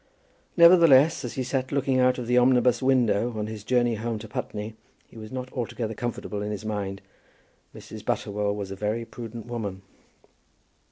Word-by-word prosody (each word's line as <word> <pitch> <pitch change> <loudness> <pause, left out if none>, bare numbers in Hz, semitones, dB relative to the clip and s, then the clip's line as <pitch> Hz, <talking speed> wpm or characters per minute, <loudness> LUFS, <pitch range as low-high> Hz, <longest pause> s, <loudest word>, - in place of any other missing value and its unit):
Nevertheless, 165 -4 +6
as 120 - -5
he 130 - -2
sat 130 0 -2
looking 135 -2 +1
out 125 0 +3
of 125 - -4
the 125 +1 +1
omnibus 125 0 +3
window, 120 -3 +2
on 105 - -2
his 110 -1 -7
journey 120 0 +2
home 115 +1 -3
to 110 +1 -9
Putney, 105 +1 -5 0.3
he - - -21
was 110 -1 -9
not 130 0 -6
altogether 115 -2 -3
comfortable 110 -3 -4
in 105 - -3
his 105 0 -5
mind. 100 -2 -4 0.7
Mrs. - - -10
Butterwell 100 0 -1
was 100 -2 -5
a - - -4
very 105 +4 -2
prudent 115 -1 -8
woman. 105 -6 -5
115 Hz, 170 wpm, -26 LUFS, 105-125 Hz, 0.7 s, Nevertheless